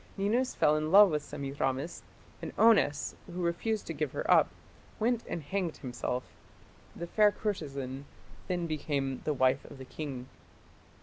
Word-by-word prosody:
Ninus 230 +6 +1
fell 150 - +4
in 155 +1 -1
love 200 -1 +8
with 150 -1 0
Semiramis, 140 +1 -3 0.4
and - - -6
Onnes, 210 -10 +4
who 180 +1 -4
refused 200 +6 -1
to 165 - -4
give 150 -2 -2
her - - -1
up, - - +6 0.5
went 235 +1 +1
and 165 - -4
hanged 180 +1 -2
himself. 125 -1 -3 0.7
The 170 - -5
fair 210 +4 +4
courtesan 140 -11 -4 0.4
then 180 -2 -1
became 140 -4 -2
the 150 - +1
wife 130 +1 +3
of - - -12
the 130 - -9
king. 130 -3 -6
155 Hz, 150 wpm, -31 LUFS, 135-195 Hz, 0.7 s, love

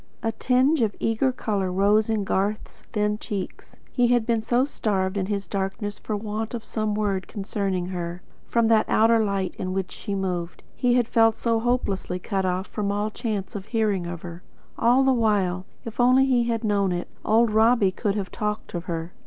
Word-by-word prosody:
A 225 - +1
tinge 260 +5 +2
of 215 -3 +1
eager 225 +4 +1
colour 205 -7 -2
rose 205 +4 +3
in 220 -2 +1
Garth's 200 +2 -2
thin 210 0 0
cheeks. 200 -4 -6 0.2
He 245 -2 +3
had 240 -2 +3
been 230 -1 +1
so 240 +3 +2
starved 195 -8 -1
in 190 -2 -1
his 200 -1 -2
darkness 200 +1 -3
for 215 - -3
want 215 +2 -4
of 230 - -6
some 215 -1 -2
word 200 -3 -1
concerning 195 -3 -2
her, 175 -1 -5 0.2
from 235 -1 +2
that 220 -1 +4
outer 225 0 +4
light 195 -3 -1
in 185 0 -2
which 190 -1 -2
she 200 -3 -4
moved. 180 -3 -3
He 245 -1 +2
had 245 -2 +2
felt 225 -1 +4
so 230 -1 0
hopelessly 225 -6 -1
cut 190 +1 -2
off 185 +1 -1
from 205 -1 -2
all 205 +1 -1
chance 210 -4 -3
of 200 0 -6
hearing 210 -6 0
of 170 -1 -6
her. 170 0 -8 0.3
And - - 0
all 250 +3 +5
the 265 0 +4
while, 195 -6 +1 0.2
if 230 +1 -8
only 255 +2 +5
he 250 -3 +2
had 230 -1 -1
known 200 -3 +1
it, 175 0 -3 0.2
old 225 +1 +3
Robbie 220 -2 +4
could 200 +1 -1
have 200 -2 -3
talked 210 0 -3
of 175 0 -4
her. 165 0 -4
210 Hz, 200 wpm, -25 LUFS, 190-230 Hz, 0.3 s, all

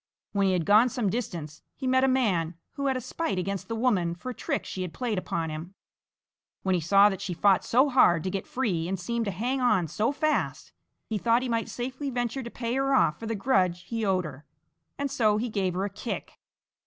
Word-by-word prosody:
When 200 -1 +2
he 190 - +2
had 175 -3 0
gone 215 +6 +6
some 235 -6 -1
distance, 170 -10 -4
he 270 - -6
met 260 0 +3
a - - +5
man 190 -11 +1 0.2
who 280 0 -3
had 265 -1 +1
a - - -2
spite 225 - -3
against 195 +1 -3
the 230 - -3
woman 200 -8 +1
for 255 +9 -6
a - - -6
trick - - -3
she 185 - -5
had 180 -3 -5
played 235 -6 -1
upon 165 -3 -3
him. 165 +5 -7 0.9
When 190 - +1
he 180 - +1
saw 195 +5 +6
that 195 -1 -5
she 190 -4 -3
fought 195 +2 +4
so 255 +5 +4
hard 175 - +4
to 185 - -2
get 195 0 -4
free 190 -11 -1
and 190 0 -2
seemed 235 +5 -2
to 200 - -1
hang 245 +8 -1
on 215 -9 +3
so 215 - 0
fast, 305 +1 -1 0.3
he 215 -2 -2
thought 235 +4 +3
he 255 - -2
might 230 -1 -1
safely 260 +3 -4
venture 245 +1 -2
to 235 - -6
pay 235 0 -3
her 270 +1 +2
off 155 -11 +3
for 225 - -6
the 225 - -1
grudge 185 -6 +1
he 230 -1 -3
owed 185 -3 +1
her, 145 -1 -8 0.5
and 280 -1 -2
so 215 -3 +3
he 235 +3 -2
gave 190 -4 -1
her 190 +2 0
a - - -2
kick. - - -6
210 Hz, 235 wpm, -27 LUFS, 185-250 Hz, 0.9 s, gone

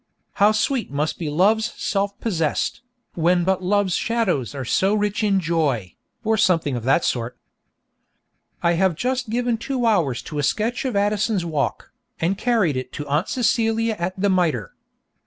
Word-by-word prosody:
'How 205 +1 +7
sweet 230 +3 0
must 150 +2 -2
be 160 -4 -3
Love's 215 +9 +2
self 200 0 -2
possessed, 165 -2 -1 0.3
when 175 +1 +2
but 190 +1 +1
Love's 195 0 +1
shadows 185 - 0
are 135 -2 -4
so 195 - +2
rich 210 0 0
in 200 -2 +3
joy!' 150 - -1 0.3
or 220 0 +1
something 165 -9 +2
of 120 - -4
that 135 +6 +3
sort. 120 0 -2 1.3
I 170 - +4
have 180 0 +2
just 255 +4 -2
given 240 0 0
two 255 0 -2
hours 170 - +1
to 150 - -5
a - - +2
sketch 220 - -1
of 255 -5 -2
Addison's 205 -1 +1
Walk, 155 -4 -2 0.3
and 175 +4 +1
carried 205 - +1
it 130 0 -5
to 150 - -5
Aunt 150 +7 0
Celia 225 -2 +1
at 185 +2 -3
the 200 0 +2
Mitre. 160 - 0
190 Hz, 165 wpm, -22 LUFS, 155-220 Hz, 1.3 s, How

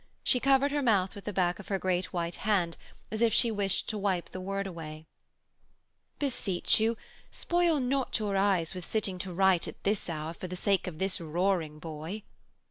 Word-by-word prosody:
She 250 - +3
covered 275 +2 +4
her 290 0 +1
mouth 200 -7 +3
with 200 - -10
the 210 - -2
back 180 -2 +1
of - - -10
her 195 - 0
great 185 -1 0
white 170 -1 -2
hand 190 -5 +1 0.4
as 215 +1 -2
if 230 -1 +5
she 235 - +4
wished 200 -3 0
to 215 - -2
wipe 190 -3 -1
the 185 - -6
word 195 +1 -2
away. 160 -4 -7 1.1
'Beseech 225 -12 +1
you, 225 +1 +2 0.3
spoil 345 -3 +1
not 265 +1 0
your 210 -3 -1
eyes 195 -4 +2
with 180 -1 -6
sitting 195 -2 -1
to 190 0 -4
write 190 -1 +3
at - - -9
this 200 -2 0
hour 155 0 -3
for 185 - -7
the 180 - -5
sake 195 +1 +1
of 170 -4 -5
this 190 +1 0
roaring 165 -1 0
boy.' 160 +6 -6
195 Hz, 195 wpm, -30 LUFS, 175-215 Hz, 1.1 s, if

